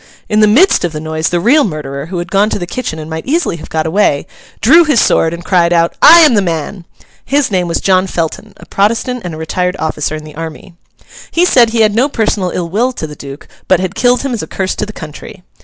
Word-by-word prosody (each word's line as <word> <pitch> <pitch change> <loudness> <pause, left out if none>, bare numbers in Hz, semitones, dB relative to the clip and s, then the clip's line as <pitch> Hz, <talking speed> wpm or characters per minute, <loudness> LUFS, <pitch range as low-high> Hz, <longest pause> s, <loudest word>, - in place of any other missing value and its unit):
In 210 - +1
the 215 - +5
midst 295 - +4
of 175 -2 -2
the 155 - -4
noise, 155 +1 -2
the 175 - 0
real 275 - +3
murderer, 145 -5 -5
who 180 +1 -5
had 175 +1 -5
gone 205 +2 +2
to - - -2
the 175 - -5
kitchen 175 -3 -5
and 155 -1 -7
might 160 +4 -6
easily 315 - 0
have - - -11
got 160 -1 -2
away, 160 -4 +1 0.3
drew 320 +10 +6
his 295 -7 +2
sword 165 - +2
and 170 0 -8
cried 175 -2 +2
out, 170 -1 +2
'I 335 +2 +9
am 305 -6 +5
the 205 - +3
man!' 170 +1 -4 0.4
His 280 -3 0
name 180 -2 0
was 170 - -1
John 185 0 +2
Felton, 180 +4 -4
a - - -14
Protestant 230 +5 -1
and 175 -3 -6
a - - -9
retired 180 +3 -2
officer 155 -1 -3
in 155 - -8
the 155 -1 -12
army. 165 +3 -8 0.6
He 345 +2 +2
said 245 -9 +4
he 225 0 0
had 215 -1 +4
had - - -6
no 255 +5 +2
personal 210 -7 -1
ill 175 -1 -3
will 235 +9 -1
to 160 - -5
the 150 -1 -9
Duke, 140 0 -10 0.2
but 185 - +3
had 185 0 -3
killed 245 +4 +1
him 275 -2 -2
as 230 - -3
a - - -7
curse 190 -1 -3
to 210 - -3
the - - -7
country. 180 +3 -11
185 Hz, 255 wpm, -13 LUFS, 160-225 Hz, 0.6 s, I